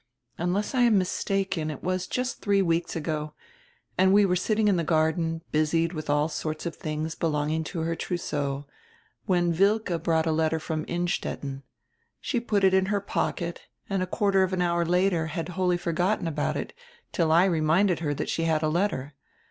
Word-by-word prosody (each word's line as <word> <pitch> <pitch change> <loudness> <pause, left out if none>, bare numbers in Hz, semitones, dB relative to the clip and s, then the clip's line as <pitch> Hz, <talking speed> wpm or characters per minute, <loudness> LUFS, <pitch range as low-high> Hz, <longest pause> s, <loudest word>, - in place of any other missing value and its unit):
"Unless 180 +7 -1
I 255 - +2
am 235 -4 +5
mistaken, 190 -3 -1
it 150 - -7
was 185 0 -1
just 250 0 -3
three 200 -1 +2
weeks 165 -1 0
ago, 155 -1 -3 0.6
and 190 0 +5
we 205 +1 +6
were 180 -2 +2
sitting 210 +4 +1
in 200 - +4
the 170 - 0
garden, 160 +1 +1
busied 165 +2 +1
with 155 -2 -6
all 145 +1 +3
sorts 155 0 -4
of 170 - -5
tilings 155 +1 -3
belonging 155 0 -1
to 165 +1 -4
her 165 +1 -1
trousseau, 145 -5 -3 0.6
when 175 -2 +2
Wilke 195 -2 +2
brought 160 -1 +1
a 160 - +1
letter 160 0 +1
from 155 -1 -3
Innstetten. 170 -5 -3 0.6
She 245 - -1
put 210 -4 0
it 190 -1 +5
in 190 0 +3
her 205 0 +1
pocket 175 -3 -2 0.3
and 195 -1 +1
a 185 - -1
quarter 195 0 +2
of 190 0 +1
an 185 - 0
hour 170 -1 +1
later 180 -2 +2
had 165 +2 -4
wholly 180 0 +1
forgotten 175 +2 0
about 150 -2 -1
it, - - -5 0.4
till 165 -2 +1
I 170 +3 +6
reminded 170 +2 +2
her 145 -3 -1
that - - -3
she 165 - -1
had 160 -1 +1
a 155 - +2
letter. 155 -5 -1
170 Hz, 190 wpm, -26 LUFS, 160-190 Hz, 0.6 s, we